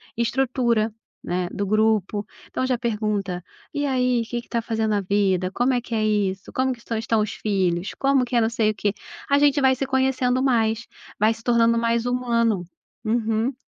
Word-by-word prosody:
estrutura, 235 -2 +1 0.3
né, 180 0 -1
do 200 - -2
grupo. 215 -1 +1 0.2
Então, 255 - -2
já 255 -1 +1
pergunta: 210 -6 -2 0.3
"E 290 0 -1
aí, 250 -3 +1
o - - -4
que 240 -1 -2
que - - -24
tá 235 - 0
fazendo 220 -1 -1
na 205 -1 +1
vida? 190 -2 +1
Como 245 +6 +1
é 250 - +2
que 235 -1 -5
é 215 -1 +1
isso? 195 -2 -1
Como 260 0 +1
que 240 - -13
estão 230 -1 -4
estão 225 0 +1
os 210 - -1
filhos? 190 -2 -1
Como 275 -2 +2
que 245 - -4
é 235 - +5
não 225 - +2
sei 225 -2 +1
o - - -9
quê?", 205 0 0 0.4
a 280 0 +4
gente 285 0 +4
vai 260 0 +4
se 270 - -2
conhecendo 260 -1 +1
mais, 225 -3 +1 0.3
vai 215 +2 +4
se 225 0 -14
tornando 230 -1 +3
mais 230 0 +1
humano. 235 -5 +1 0.4
Uhum. 225 +2 0
230 Hz, 200 wpm, -23 LUFS, 210-250 Hz, 0.4 s, é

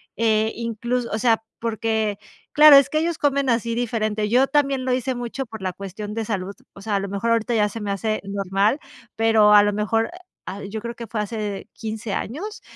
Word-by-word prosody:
eh, 220 -1 +2
inclus 235 +2 -2
o 215 - -3
sea, 225 -1 +2 0.2
porque 220 -2 -1 0.4
claro, 300 -1 +9
es 275 0 +5
que 310 - +1
ellos 335 0 -1
comen 280 -2 +1
así 230 -1 0
diferente, 215 -3 -1
yo 255 +4 +4
también 275 -3 +1
lo 255 - +1
hice 255 +1 -1
mucho 245 +2 -4
por 220 -3 -10
la 185 -1 -2
cuestión 200 +2 -7
de 225 0 -3
salud, 200 -2 -3 0.2
o 195 - -13
sea, 210 0 -2
a - - +2
lo 200 0 -4
mejor 200 +4 -1
ahorita 230 +1 +1
ya 210 -1 +2
se 225 - -7
me 205 -1 -3
hace 215 +2 -2
normal, 200 +5 0 0.4
pero 220 -2 +4
a 205 0 +8
lo 205 - +2
mejor, 215 +2 0
eh, - - -10 0.3
ah, 200 +2 -6
yo 200 +2 -5
creo 235 +1 -5
que 235 -1 -8
fue 215 0 -2
hace 210 -2 -4
15 220 -1 -5
años, 410 - -5
225 Hz, 215 wpm, -22 LUFS, 210-245 Hz, 0.4 s, claro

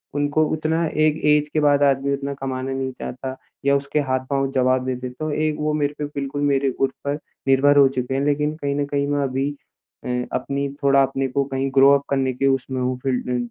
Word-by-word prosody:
उनको 145 +2 +2
उतना 160 +2 0
एक 155 0 +1
ऐज 150 0 +4
के 155 - 0
बाद 145 -1 +4
आदमी 140 0 +2
उतना 140 0 -3
कमाना 130 0 -3
नहीं 135 0 -2
चाहता 130 +1 -5 0.3
या 140 0 +4
उसके 140 +2 -1
हाथ-पाँव 135 +1 0
जवाब 130 -1 +2
दे 130 - -1
देते 125 0 -6
तो 155 0 -2
एक 155 0 0
वो 150 0 0
मेरे 145 -1 0
पे 150 - -1
बिल्कुल, 145 -1 -4
मेरे 140 -1 +2
ऊपर 140 +2 -1 0.3
निर्भर 140 +2 +4
हो 140 -1 +7
चुके 130 -1 -3
हैं। 135 - 0
लेकिन 150 +1 0
कहीं 140 -2 -2
न 145 0 0
कहीं 140 0 -1
मैं 145 0 0
अभी 135 +1 -1 0.6
अ, - - -4 0.3
अपनी 140 +2 -1 0.2
थोड़ा 140 0 +5
अपने 135 0 -1
को 140 +2 0
कहीं 135 0 -2
ग्रो 135 +1 +7
अप 140 - -10
करने 135 -2 +1
के 135 +2 0
उसमें 135 -1 0
हूँ 125 0 -1
फ़ील्ड 130 -2 -1
अ, 125 - 0
140 Hz, 220 wpm, -22 LUFS, 135-145 Hz, 0.6 s, हो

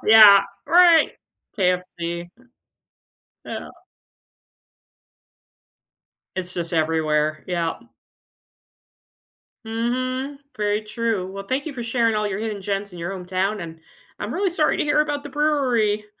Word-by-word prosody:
Yeah, 210 -2 +9 0.3
right. 345 -2 +6 0.5
KFC. 175 -2 -1 1.2
Yeah. - - -6 2.7
It's 185 -1 -4
just 170 -1 -4
everywhere, 155 -1 +1
yeah. 170 -2 -1 1.9
Mhm, 255 +5 -2 0.2
very 210 0 0
true, 215 -3 -2
well 195 0 -6
thank 270 +6 -2
you 310 - -4
for 245 -3 -6
sharing 230 -1 +1
all 210 0 0
your 200 -1 -3
hidden 215 -3 -4
gems 200 0 -3
in 175 - -10
your 170 +3 -4
hometown, 190 +2 -2
and 165 -1 -8 0.4
I'm - - -3
really 390 -1 +1
sorry 320 -3 +1
to - - 0
hear 300 0 +3
about 295 -1 -1
the - - -6
brewery. 255 -8 +1
210 Hz, 120 wpm, -23 LUFS, 180-255 Hz, 2.7 s, Yeah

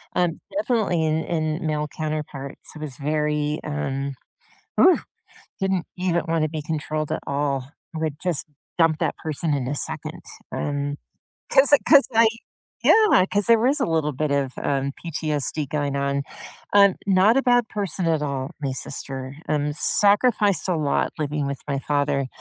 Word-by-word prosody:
um, 175 -2 0 0.2
definitely 215 - +1
in 155 +1 0
in 160 0 -2
male 150 0 -1
counterparts. 150 -3 -5
I - - -9
was 150 -4 -5
very 150 0 -1
um 135 - -3 0.7
Ooh, 370 - +6 0.6
didn't 190 -2 0
even 180 -1 0
wanna 160 -2 0
be 155 -1 -4
controlled 155 -1 -3
at - - -2
all. 140 -1 -2 0.2
I - - -3
would 155 -3 -2
just 175 -5 0 0.3
dump 165 -2 +4
that - - -1
person 155 0 -2
in 130 -3 -1
a 145 - -2
second - - -3 0.3
and 145 0 -3 0.5
'Cause 280 +2 +8
I - - +10
'cause 285 -2 +7
I, 225 0 +6 0.6
yeah, 425 - +5
'cause 205 +1 +3
there 230 -1 +6
was 270 +6 +2
a - - +3
little 160 -2 0
bit 150 +2 -1
of, 140 -2 0
um, 140 0 -1
PTSD 155 -2 -2
going 145 0 -2
on. 140 0 -1 0.5
Um, 200 -2 +6
not 195 +5 +4
a 270 - +3
bad 245 -3 +3
person 190 -4 -2
at 160 -2 +1
all- 140 -2 -3
my 135 - -1
sister, 130 0 -5
um, 150 -1 0
sacrificed 205 -1 +3
a 170 - +1
lot 150 -2 0
living 150 -1 -2
with 140 -3 -4
my 140 - -1
father. 140 -1 0
155 Hz, 165 wpm, -23 LUFS, 140-185 Hz, 0.7 s, I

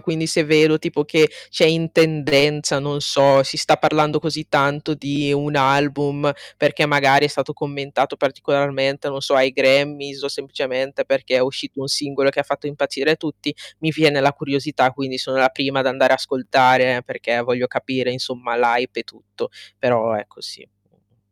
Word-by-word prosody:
quindi 160 -2 -3
se 165 +1 +1
vedo 155 0 +4
tipo 155 -2 -3
che 155 0 +3 0.2
c'è - - +3
in 165 +1 0
tendenza 150 -2 +2
non 145 +1 -4
so, 140 -1 +4
si 140 +4 -4
sta 155 - +3
parlando 155 0 +1
così 155 -1 -4
tanto 145 +3 0
di 145 0 -3
un 145 +1 -1
album, 145 +1 +1 0.2
perché 150 +1 +1
magari 145 0 +4
è - - -5
stato 145 +1 -4
commentato 140 -2 -3
particolarmente, 140 0 -1
non 135 0 -6
so, 140 - 0
ai 130 0 +4
Grammy's 140 +1 +1
o 140 - -3
semplicemente 135 0 -4
perché 135 -1 -1
è - - +3
uscito 135 - -4
un 135 - -6
singolo 140 -1 0
che 140 - -2
ha - - -1
fatto 140 +1 -5
impazzire 145 +1 -1
tutti, 150 -2 -6 0.3
mi 160 - -1
viene 150 -2 +3
la 140 +1 +3
curiosità, 140 -2 -1
quindi 130 -1 -6
sono 130 +1 -3
la 130 0 +4
prima 135 0 -2
ad 135 - -1
andare 130 0 +3
a - - +4
ascoltare, 130 -1 +2
perché 120 0 -3
voglio 125 +1 -1
capire 125 0 -3
insomma 125 -1 -5
l' 120 - +1
hype 120 0 0
e - - -8
tutto. 100 -2 -10 0.3
Però 115 -1 +1
ecco 105 -1 -8
sì. - - -11 0.3
Mh. 100 +5 -43
140 Hz, 180 wpm, -19 LUFS, 130-150 Hz, 0.3 s, vedo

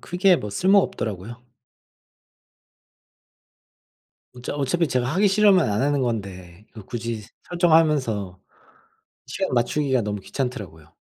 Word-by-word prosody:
크게 180 0 +2
뭐 105 - -6
쓸모 190 - +3
없더라고요. 110 - -3 3.0
어차 125 +2 -6
어차피 145 +4 0
제가 125 -2 0
하기 200 +3 +3
싫으면 195 - +4
안 100 - 0
하는 145 0 +1
건데 95 -5 -5
이걸 110 -4 -12
굳이 115 -2 -5 0.3
설정하면서 150 - +1 0.9
시간 - - -3
맞추기가 130 +1 +1
너무 105 -1 -4
귀찮더라고요. 105 - -6
125 Hz, 270 characters per minute, -23 LUFS, 105-165 Hz, 3.0 s, 싫으면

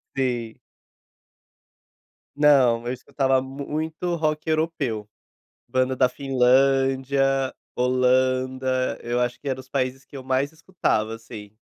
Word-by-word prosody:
Sim. 120 -4 -2 1.8
Não, 130 -6 +4
eu 125 - -1
escutava 130 +1 0
muito 155 +6 -4
rock 155 -1 -1
europeu. 155 -10 -1 0.6
Banda 130 +1 +1
da 130 0 +3
Finlândia, 135 +1 +2 0.2
Holanda, 130 +1 +1
eu 120 +1 -1
acho 125 0 -1
que 145 - -9
era 130 -1 -1
os 130 - -12
países 130 0 -2
que 140 - -11
eu 130 - -8
mais 130 +2 0
escutava, 155 -10 -1
assim, 110 -2 -11
130 Hz, 115 wpm, -24 LUFS, 125-140 Hz, 1.8 s, Não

